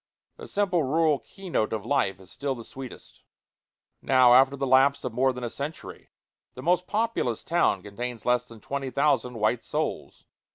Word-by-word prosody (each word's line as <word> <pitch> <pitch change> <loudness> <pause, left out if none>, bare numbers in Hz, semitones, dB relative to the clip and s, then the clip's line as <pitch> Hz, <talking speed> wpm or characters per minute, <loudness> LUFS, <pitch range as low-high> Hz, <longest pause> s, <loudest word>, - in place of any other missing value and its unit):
The - - -10
simple 195 -4 +1
rural 155 +1 +2
key 195 -1 -13
note 110 - +1
of 110 -1 -3
life 120 -7 0
is 95 -1 -16
still 140 -1 -3
the 115 - -9
sweetest. 130 +2 -11 0.8
Now, 130 -2 +5
after 135 +2 +5
the 135 0 -2
lapse 135 +2 +4
of 125 - -4
more 130 +3 +2
than 125 -1 -7
a 120 - -2
century, 145 +3 -7 0.5
the 130 - -8
most 180 +2 +2
populous 215 - -1
town 165 - +1
contains 115 +3 -6
less 125 0 +2
than 115 -3 -14
twenty 140 +2 -4
thousand 140 -3 +1
white 110 +2 0
souls. - - -4
130 Hz, 175 wpm, -26 LUFS, 120-145 Hz, 0.8 s, Now